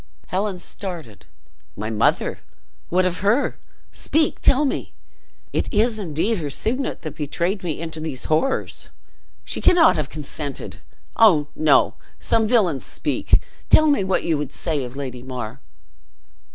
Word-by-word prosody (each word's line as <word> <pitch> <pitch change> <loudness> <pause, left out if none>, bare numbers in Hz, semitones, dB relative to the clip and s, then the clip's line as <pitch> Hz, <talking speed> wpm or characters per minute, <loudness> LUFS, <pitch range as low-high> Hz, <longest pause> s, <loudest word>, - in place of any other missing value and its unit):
Helen 195 0 -1
started. 165 - -7 0.5
"My 105 +2 -4
mother! 105 - +1 0.5
what 185 +1 +2
of 180 -1 -1
her? 210 +8 +2 0.3
Speak! 315 -1 0
tell 285 +3 +4
me! 275 - -2 0.6
It - - -1
is 220 +1 +2
indeed 190 +4 0
her 150 -3 -3
signet 250 - -1
that 155 -4 -5
betrayed 170 +6 -2
me 165 -4 -3
into 160 -1 -5
these 155 -5 -4
horrors. 160 +13 0 0.5
She - - -3
cannot 335 - +6
have 150 -3 -2
consented! 145 -2 -6 0.4
Oh, 165 -10 +5
no! 155 - +4 0.2
some 225 -1 +2
villians 195 - +2
speak! - - 0 0.3
tell 310 - +7
me 285 -9 +3
what 190 0 0
you 160 -3 +1
would 145 -2 -4
say 155 -5 -2
of 125 +1 -7
Lady 130 -3 -5
Mar?" 125 -1 -6
165 Hz, 140 wpm, -22 LUFS, 145-210 Hz, 0.6 s, tell